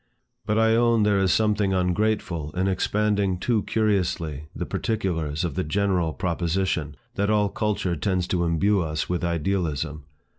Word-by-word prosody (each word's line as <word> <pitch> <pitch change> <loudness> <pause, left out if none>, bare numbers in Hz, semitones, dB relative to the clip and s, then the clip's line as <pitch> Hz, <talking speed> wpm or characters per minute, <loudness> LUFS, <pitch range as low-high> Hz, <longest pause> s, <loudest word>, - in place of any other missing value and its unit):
But 105 0 +1
I 110 0 +4
own 115 -1 +3
there 105 -1 +3
is 95 -1 +2
something 105 -3 +2
ungrateful 90 -4 0
in 95 +1 +1
expanding 100 0 +1
too 115 +3 +1
curiously 90 -9 -1
the - - -3
particulars 85 -8 -2
of 85 - -3
the 95 - -1
general 90 0 0
proposition, 85 -2 -1 0.2
that 100 +1 0
all 105 -1 +2
culture 100 -4 -1
tends 90 +3 0
to 90 -2 +1
imbue 90 +4 +2
us 75 -2 -2
with 90 0 -2
idealism. 80 -4 -1
95 Hz, 150 wpm, -25 LUFS, 85-105 Hz, 0.2 s, I